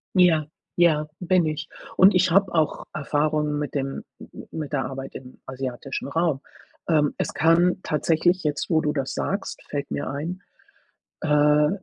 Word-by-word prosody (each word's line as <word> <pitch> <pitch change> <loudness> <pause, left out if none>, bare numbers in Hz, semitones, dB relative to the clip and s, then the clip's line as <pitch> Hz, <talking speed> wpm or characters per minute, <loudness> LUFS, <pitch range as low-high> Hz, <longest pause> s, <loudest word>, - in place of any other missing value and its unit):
Ja, 170 -4 +5 0.3
ja, 155 -3 +3
bin 180 -1 +2
ich. 155 0 -3 0.3
Und 190 +2 +7
ich 180 -1 +3
habe 195 0 +3
auch 160 -2 0
Erfahrung 150 0 0
mit 150 - -4
dem 135 -1 -3 0.2
m - - -12
m - - -10
mit 150 -2 -5
der 135 - 0
Arbeit 135 0 -7
im 130 -1 -10
asiatischen 130 0 -5
Raum, 160 -2 0 0.5
ähm, 150 -3 +3
es - - -2
kann 170 +4 +3
tatsächlich 170 +4 +1
jetzt, 150 -1 -2
wo 160 -3 +3
du 150 0 0
das 135 -3 -2
sagst, 195 +2 -3
fällt 140 -1 -4
mir 145 - -3
ein, 160 +7 -4 0.8
äh, 150 0 +4
150 Hz, 160 wpm, -24 LUFS, 145-170 Hz, 0.8 s, Und